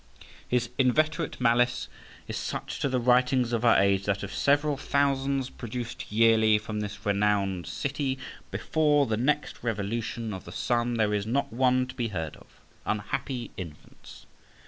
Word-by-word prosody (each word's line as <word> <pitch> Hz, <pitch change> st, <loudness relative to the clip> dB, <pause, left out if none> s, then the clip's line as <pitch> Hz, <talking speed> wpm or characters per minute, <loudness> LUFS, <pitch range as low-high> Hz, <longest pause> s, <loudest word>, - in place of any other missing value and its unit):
His 125 Hz, -1 st, 0 dB
inveterate 155 Hz, +4 st, +1 dB
malice 125 Hz, 0 st, +2 dB, 0.4 s
is -, -, -4 dB
such -, -, -4 dB
to 140 Hz, -, 0 dB
the 130 Hz, -1 st, +1 dB
writings 125 Hz, 0 st, +3 dB
of 115 Hz, 0 st, 0 dB
our 120 Hz, -, +6 dB
age, 100 Hz, 0 st, +3 dB
that, 100 Hz, 0 st, 0 dB
of 100 Hz, -, -6 dB
several 145 Hz, +1 st, +2 dB
thousands 135 Hz, -1 st, 0 dB
produced 120 Hz, -2 st, -6 dB
yearly 110 Hz, -1 st, +5 dB
from 105 Hz, 0 st, -4 dB
this 105 Hz, 0 st, -6 dB
renowned 100 Hz, -3 st, +1 dB
city, 140 Hz, -1 st, -2 dB, 0.3 s
before 150 Hz, -2 st, +2 dB
the 110 Hz, -, 0 dB
next 145 Hz, +6 st, 0 dB
revolution 115 Hz, 0 st, -2 dB
of 95 Hz, -, -7 dB
the 85 Hz, -, -9 dB
sun 120 Hz, +5 st, 0 dB
there 105 Hz, -2 st, +1 dB
is 105 Hz, 0 st, -1 dB
not 135 Hz, +1 st, 0 dB
one 130 Hz, +1 st, +3 dB
to 130 Hz, -, -9 dB
be 120 Hz, -3 st, -2 dB
heard 80 Hz, -7 st, -4 dB
of. -, -, -18 dB, 0.4 s
Unhappy 120 Hz, +2 st, -3 dB
infants! 85 Hz, -5 st, -10 dB
120 Hz, 155 wpm, -28 LUFS, 105-135 Hz, 0.4 s, our